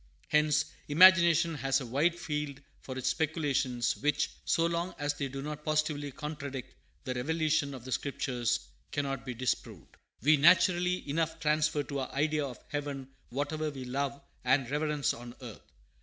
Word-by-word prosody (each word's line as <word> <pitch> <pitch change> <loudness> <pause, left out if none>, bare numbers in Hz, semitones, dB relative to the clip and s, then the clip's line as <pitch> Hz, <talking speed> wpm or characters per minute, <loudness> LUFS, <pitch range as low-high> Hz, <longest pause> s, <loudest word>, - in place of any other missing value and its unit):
Hence 150 0 +3 0.2
imagination 170 0 +6
has 135 -1 +1
a 130 - -6
wide 145 +8 +2
field 150 -4 -3 0.2
for 130 -1 -7
its 130 - 0
speculations, 145 -6 0
which, 150 +1 +1
so 165 - +2
long 170 +2 -1
as 145 0 -1
they 145 -1 -3
do 135 +1 -6
not 150 0 -6
positively 150 -2 0
contradict 140 -3 -6 0.3
the 130 -3 -2
revelation 155 +1 0
of 125 -2 -10
the 130 - -7
Scriptures, 125 -4 -1 0.3
cannot 135 -2 -2
be 125 - -4
disproved. 130 +2 -3 0.3
We 150 +2 +6
naturally 180 +3 +4
enough 160 +2 -1
transfer 150 -1 +1
to 140 0 -4
our 130 - -4
idea 150 +1 +1
of 125 - -8
heaven 140 -2 -4 0.2
whatever 150 +4 -2
we 135 -3 -7
love 140 +2 -2 0.2
and 130 0 +3
reverence 150 -2 0
on 120 0 -9
earth. 120 -5 -11
145 Hz, 155 wpm, -31 LUFS, 135-155 Hz, 0.3 s, imagination